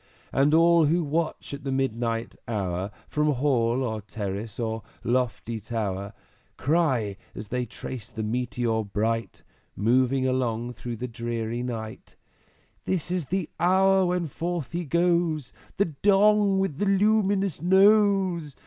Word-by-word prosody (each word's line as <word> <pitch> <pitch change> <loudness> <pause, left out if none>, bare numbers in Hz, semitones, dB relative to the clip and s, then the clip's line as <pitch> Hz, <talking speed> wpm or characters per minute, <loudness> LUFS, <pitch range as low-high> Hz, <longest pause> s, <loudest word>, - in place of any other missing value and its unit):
And 140 +2 +3
all 170 0 +5
who 170 +3 +2
watch 155 0 -2
at 140 0 -7
the 135 - -2
midnight 115 -3 -1
hour, 95 -4 -2 0.2
From 150 -1 +1
Hall 125 -2 +1
or 110 -3 -3
Terrace 105 0 -5
or 110 -1 -2 0.2
lofty 120 -2 -1
Tower, 100 -2 -3 0.4
Cry, 130 - +1 0.2
as 105 - -7
they 125 0 -2
trace 115 0 -7
the 110 - -5
Meteor 115 0 -1
bright, 110 +3 -2 0.3
Moving 130 +5 +2
along 125 -2 -1
through 120 +1 -6
the 125 +3 -4
dreary 115 0 -3
night, 115 -3 -6 0.7
"This 175 -2 -1
is 180 -4 -1
the 185 +3 -2
hour 190 +1 +4
when 180 -1 0
forth 165 -1 -4
he 175 0 -3
goes, 170 -3 +1 0.2
The 200 - +3
Dong 200 +4 +3
with 190 -6 -1
a - - +3
luminous 200 -3 +2
Nose! 190 -4 +4
130 Hz, 135 wpm, -26 LUFS, 115-175 Hz, 0.7 s, all